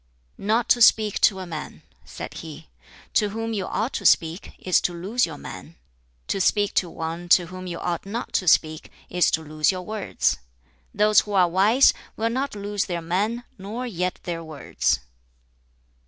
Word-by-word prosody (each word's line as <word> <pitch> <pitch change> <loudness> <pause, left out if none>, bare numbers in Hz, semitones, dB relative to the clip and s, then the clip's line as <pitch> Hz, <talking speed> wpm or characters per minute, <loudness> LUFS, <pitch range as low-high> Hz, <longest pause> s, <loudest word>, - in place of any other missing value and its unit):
"Not 220 +4 +1
to 240 - +4
speak 215 -2 +5
to 195 - +4
a 190 - -5
man." 160 -3 -7 0.2
said - - -8
he, 160 -1 -10 0.4
"to 210 -2 +3
whom 225 +2 -4
you 195 -3 -2
ought 225 +5 -2
to - - -4
speak, 165 +3 +2
is 185 - +2
to 175 - -1
lose 210 +5 +1
your 155 -3 -8
man; 165 - -10 0.5
to 195 - -1
speak 205 +2 +2
to 180 - +1
one 165 +2 -5
to 175 0 +6
whom 185 0 -7
you 170 -1 -4
ought 175 -1 -3
not 230 +4 -5
to 185 - 0
speak 155 -1 +2 0.2
is 180 0 +3
to 160 - -1
lose 155 +2 +1
your 185 -1 -5
words. 210 - -1 0.5
Those 210 0 +4
who 210 - -3
are 185 -2 +5
wise 205 +10 +5 0.2
will 225 +1 0
not 265 0 -2
lose 205 0 -2
their 170 -3 -4
man 205 +8 -1 0.2
nor 215 +6 -5
yet 180 -6 -2
their 170 -1 -4
words." 150 - -1
185 Hz, 180 wpm, -24 LUFS, 170-215 Hz, 0.5 s, to